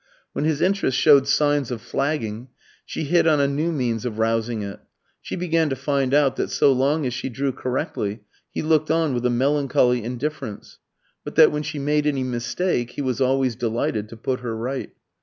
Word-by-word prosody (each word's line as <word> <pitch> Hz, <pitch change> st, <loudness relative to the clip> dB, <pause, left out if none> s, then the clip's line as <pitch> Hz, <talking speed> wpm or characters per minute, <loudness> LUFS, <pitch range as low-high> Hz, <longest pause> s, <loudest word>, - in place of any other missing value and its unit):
When 150 Hz, -, -1 dB
his 155 Hz, -2 st, 0 dB
interest 190 Hz, -8 st, +1 dB
showed 140 Hz, -3 st, +6 dB
signs 145 Hz, -2 st, +2 dB
of 120 Hz, -3 st, -4 dB
flagging, 120 Hz, -2 st, -2 dB, 0.4 s
she -, -, -5 dB
hit 165 Hz, +3 st, +3 dB
on 155 Hz, -2 st, +4 dB
a 140 Hz, -, +3 dB
new 150 Hz, +5 st, -1 dB
means 120 Hz, -7 st, -1 dB
of 120 Hz, -4 st, -4 dB
rousing 115 Hz, 0 st, 0 dB
it. 100 Hz, -1 st, -7 dB, 0.4 s
She -, -, -5 dB
began 165 Hz, -3 st, +1 dB
to 135 Hz, -, -1 dB
find 140 Hz, -2 st, 0 dB
out 140 Hz, -2 st, +3 dB
that -, -, -1 dB
so 140 Hz, -, +4 dB
long 140 Hz, +4 st, +1 dB
as 125 Hz, -, -1 dB
she 125 Hz, +2 st, -4 dB
drew 135 Hz, +2 st, -1 dB
correctly, 120 Hz, -5 st, -3 dB, 0.3 s
he -, -, -4 dB
looked 155 Hz, -1 st, +2 dB
on 160 Hz, -3 st, +2 dB
with 125 Hz, 0 st, 0 dB
a -, -, +1 dB
melancholy 125 Hz, -2 st, +2 dB
indifference, 125 Hz, -1 st, -5 dB, 0.4 s
but -, -, -8 dB
that -, -, +7 dB
when 150 Hz, -, -2 dB
she 150 Hz, 0 st, -5 dB
made 150 Hz, +1 st, +1 dB
any 140 Hz, -3 st, 0 dB
mistake 125 Hz, +2 st, -2 dB
he -, -, -4 dB
was 130 Hz, 0 st, -2 dB
always 130 Hz, -2 st, +2 dB
delighted 110 Hz, -2 st, -2 dB
to 115 Hz, -, -10 dB
put 125 Hz, +3 st, -2 dB
her 120 Hz, -2 st, -4 dB
right. 130 Hz, +4 st, -4 dB
135 Hz, 195 wpm, -23 LUFS, 120-150 Hz, 0.4 s, that